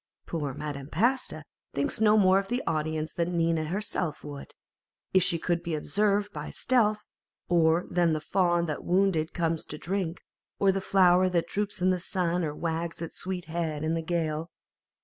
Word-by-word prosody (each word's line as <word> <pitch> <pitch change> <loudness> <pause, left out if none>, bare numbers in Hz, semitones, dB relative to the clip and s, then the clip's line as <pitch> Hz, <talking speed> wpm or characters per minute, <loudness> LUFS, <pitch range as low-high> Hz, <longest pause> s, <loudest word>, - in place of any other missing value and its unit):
Poor 145 -5 -3
Madame 145 -2 -5
Pasta 225 - 0 0.3
thinks 140 +9 -1
no 215 0 +6
more 190 -1 +5
of 195 - -5
the 245 +4 -1
audience 155 -1 -1
than 170 0 -1
Nina 165 -1 +1
herself 180 -3 -3
would, 145 -1 -9 0.6
if 190 - +6
she 170 -1 +2
could 170 +1 -1
be 170 -2 -2
observed 205 +7 0
by 150 -1 -5
stealth, 215 -4 +1 0.4
or 170 0 +3
than 175 -2 +2
the 155 - 0
fawn 175 +1 +1
that 155 -3 -4
wounded 180 -4 +2
comes 165 -2 -1
to 150 - -7
drink, 180 0 -3 0.3
or 195 -1 +4
the 195 0 -2
flower 185 -1 +4
that 170 -2 0
droops 205 -2 -2
in 185 - +4
the 185 - 0
sun 180 -1 -1
or 150 -2 -2
wags 165 +1 -3
its 165 -1 -6
sweet 185 -1 -3
head 160 -2 -3
in 160 +1 0
the 165 - 0
gale. 160 -1 -2
170 Hz, 180 wpm, -28 LUFS, 160-190 Hz, 0.6 s, no